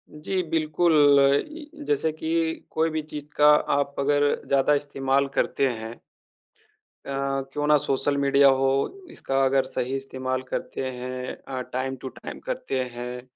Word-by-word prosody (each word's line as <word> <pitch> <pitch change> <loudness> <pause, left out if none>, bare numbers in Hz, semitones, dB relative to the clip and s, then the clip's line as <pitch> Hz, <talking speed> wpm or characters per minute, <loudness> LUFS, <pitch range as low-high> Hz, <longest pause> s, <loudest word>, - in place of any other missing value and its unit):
जी, 185 +5 -2
बिल्कुल। 160 +1 +1 0.6
ई 305 -1 -10 0.2
जैसे 150 +2 +1
कि 160 +1 -6 0.4
कोई 160 +1 +1
भी 155 0 -2
चीज़ 150 -1 -8
का 150 - +6 0.3
आप 140 0 -1
अगर 145 +1 +2 0.2
ज़्यादा 140 +1 +3
इस्तेमाल 140 -1 0
करते 135 - +1
हैं 115 -1 -6 1.1
अ, - - -8 0.4
क्यों 145 0 -1
ना 150 - +6
सोशल 140 +1 0
मीडिया 140 0 +5
हो, 135 - +3 0.4
इसका 135 - -1
अगर 135 0 +2
सही 130 +2 -3
इस्तेमाल 130 -1 -3
करते - - -4
हैं 125 0 -5
अ, 130 -1 -4
टाइम 130 +1 -2
टू 130 - -5
टाइम - - -9
करते 130 - -3
हैं, 125 +1 -6
140 Hz, 150 wpm, -25 LUFS, 130-150 Hz, 1.1 s, का